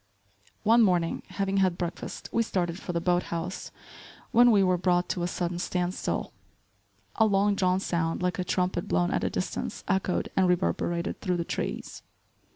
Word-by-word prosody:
One 230 +3 +5
morning, 175 -5 +2
having 195 0 -1
had 185 -3 +2
breakfast, 175 -1 -5
we 230 - +2
started 180 -5 -1
for 180 - -5
the 170 - 0
boat 175 +1 +2
house, 170 +2 -4 0.6
when 240 0 +6
we 205 -4 +5
were 185 -1 +3
brought 180 0 +1
to 180 - -1
a 175 - 0
sudden 175 0 -2
stand 180 0 -1
still. - - -3 0.8
A 220 - +5
long 200 0 +3
drawn 185 -1 +2
sound 165 -3 -1
like 180 -1 -1
a - - +1
trumpet 180 -1 -1
blown 90 0 +1
at - - 0
a - - +1
distance - - -4
echoed 190 -1 0
and 190 -1 +4
reverberated 175 0 0
through 180 -2 0
the 170 - -2
trees. - - -4
180 Hz, 175 wpm, -28 LUFS, 175-195 Hz, 0.8 s, when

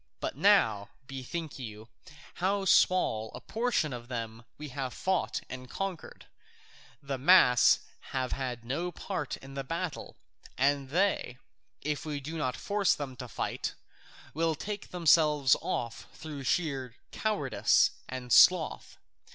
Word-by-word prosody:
But - - -3
now, 105 -3 +3 0.2
bethink 135 +4 -6
you, 110 -3 -8 0.5
how 195 +1 +1
small 115 - +3
a - - -7
portion 225 - -1
of 120 -1 -7
them 115 -2 -5
we 150 0 -7
have 130 -1 -4
fought 190 -1 -1
and 125 -1 -8
conquered; 195 0 -5 0.8
the 135 -1 -4
mass 130 -5 +6 0.3
have 130 -1 -2
had 125 -3 -4
no 165 +9 -2
part 175 -5 -4
in 135 0 -12
the 135 0 -4
battle, 165 +2 -5 0.4
and 140 0 +1
they, 175 -6 0 0.4
if 150 -1 -2
we 150 -2 -4
do 150 +4 -7
not 145 -6 -2
force 205 -1 +1
them 140 -3 -6
to 125 - -7
fight, - - -3 0.6
will 160 +1 +1
take 205 +5 -6
themselves 150 -6 +4
off 115 -1 -4
through 150 -4 -7
sheer 135 -8 -1 0.2
cowardice 205 -12 +2 0.2
and 125 -2 -3
sloth. 180 -3 +5
140 Hz, 135 wpm, -30 LUFS, 125-170 Hz, 0.8 s, mass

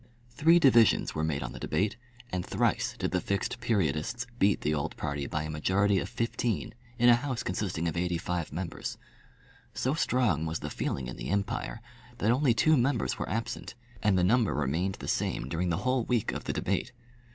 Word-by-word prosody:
Three 160 +6 +5
divisions 120 -8 +5
were 80 - -2
made 75 -3 -1
on - - -5
the - - -8
debate, 100 +2 0 0.4
and 90 -1 -1
thrice - - 0
did - - -2
the 90 - +1
Fixed 100 +6 -2
Periodists 100 - 0
beat 100 +1 +3
the 75 - +1
old 70 -2 -2
party 70 -1 -3
by 75 - -2
a 80 - -5
majority 95 +6 +2
of - - -4
fifteen 115 0 -2 0.2
in 120 0 +4
a 120 - +9
House 125 0 -1
consisting 90 -3 -2
of 80 - -2
eighty 90 0 0
five 85 -1 -3
members. 85 +3 -4 0.8
So 130 - 0
strong 120 - +1
was 80 +1 -3
the - - -5
feeling 65 - -2
in 65 - -7
the - - -5
empire, 100 +3 -2 0.4
that 115 -1 +2
only 125 -1 +3
two 155 +5 +4
members 125 -1 +1
were - - -3
absent, 115 +1 -4 0.3
and 105 -3 +3
the 90 - +3
number 110 +3 +3
remained 80 +7 0
the - - -8
same - - -1
during 85 +5 -1
the 85 - +1
whole 130 -1 +2
week 120 -2 0
of - - -6
the - - -1
debate. - - -1
100 Hz, 195 wpm, -29 LUFS, 80-120 Hz, 0.8 s, a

